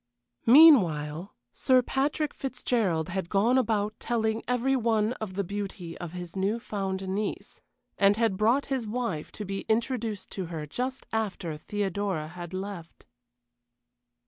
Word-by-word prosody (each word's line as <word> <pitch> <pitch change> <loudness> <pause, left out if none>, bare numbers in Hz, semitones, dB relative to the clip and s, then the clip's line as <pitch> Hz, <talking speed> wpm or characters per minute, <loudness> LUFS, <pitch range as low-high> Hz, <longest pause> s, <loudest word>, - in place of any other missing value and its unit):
Meanwhile, 185 - +6 0.2
Sir 255 -1 +3
Patrick 285 +4 -1
Fitzgerald 230 - -1
had 185 -1 -3
gone 230 +6 +3
about 215 -3 0
telling 220 -1 0
every 250 +2 +1
one 225 -2 +1
of 195 -4 -5
the 200 - 0
beauty 195 -3 -5
of 175 -2 -6
his 175 -1 -7
new 200 +4 0
found 195 -3 -3
niece, 200 +2 -4 0.4
and 200 +1 +5
had 225 -4 +2
brought 230 +8 +2
his 260 -5 -2
wife 210 -9 -3
to 210 - -6
be 195 0 -3
introduced 225 -2 -1
to 190 - -4
her 160 -3 -5
just 255 - -4
after 195 -7 -2
Theodora 195 -2 -2
had 175 0 -8
left. 190 -3 -7
205 Hz, 140 wpm, -28 LUFS, 185-235 Hz, 0.4 s, Meanwhile